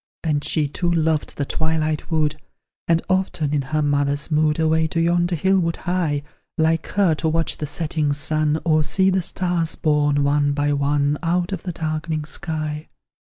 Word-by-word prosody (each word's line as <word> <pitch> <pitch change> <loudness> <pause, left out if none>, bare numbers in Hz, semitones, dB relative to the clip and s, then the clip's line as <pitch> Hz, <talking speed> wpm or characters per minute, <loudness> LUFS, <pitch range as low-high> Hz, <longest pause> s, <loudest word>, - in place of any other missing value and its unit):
And 150 -3 0
she 150 0 +1
too 175 +5 -1
loved 160 -2 0
the 140 - -1
twilight 155 +1 -1
wood 155 -2 +1 0.5
And 165 0 +2
often, 185 -6 0
in 145 - +2
her 155 +3 -1
mother's 145 +1 0
mood, 150 0 +2
Away 160 0 +2
to 165 - -2
yonder 175 +1 +2
hill 190 +4 +2
would 165 -2 0
hie, 170 -6 -1 0.3
Like 160 0 +1
her, 190 -5 +4
to 155 +1 -1
watch 165 +1 0
the 150 - -4
setting 150 0 -1
sun, 155 +1 0
Or 155 -2 +3
see 190 +5 +2
the 190 0 +1
stars 175 -1 -1
born, 145 -2 +2
one 145 0 +2
by 145 0 0
one, 145 +1 +1
Out 175 +1 0
of 190 -4 -3
the 180 - -4
darkening 155 -1 -3
sky. 155 -2 -5
155 Hz, 175 wpm, -22 LUFS, 150-165 Hz, 0.5 s, her